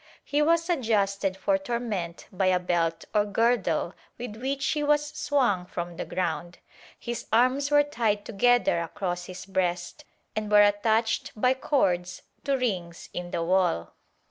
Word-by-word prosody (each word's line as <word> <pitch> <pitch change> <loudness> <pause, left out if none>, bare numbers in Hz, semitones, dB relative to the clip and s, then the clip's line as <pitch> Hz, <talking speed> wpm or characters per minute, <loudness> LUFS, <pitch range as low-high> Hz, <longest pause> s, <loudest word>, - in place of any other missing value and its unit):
He 290 +1 0
was 330 +2 +3
adjusted 200 - 0
for 290 +8 +1
torment 230 -10 -3
by 190 -1 0
a 185 -1 +4
belt 165 -2 -1
or 210 -1 +4
girdle 210 -3 +1 0.2
with 240 -3 -6
which 270 +3 -2
he 300 - 0
was 295 0 +2
swung 255 -11 0
from 175 -1 -5
the - - -3
ground; 175 -1 -3 0.4
his 240 -1 -5
arms 255 +5 +3
were 290 0 +5
tied 225 -8 -1
together 240 -4 +3
across 175 +1 -3
his 180 0 -8
breast 180 +6 -2 0.3
and 215 -1 -2
were 210 0 +8
attached 220 +2 +1
by 250 +3 +4
cords 185 -10 0 0.2
to 275 -1 +2
rings 180 -9 -3
in 175 0 -5
the 170 - -2
wall. 175 - +1
210 Hz, 150 wpm, -27 LUFS, 180-255 Hz, 0.4 s, were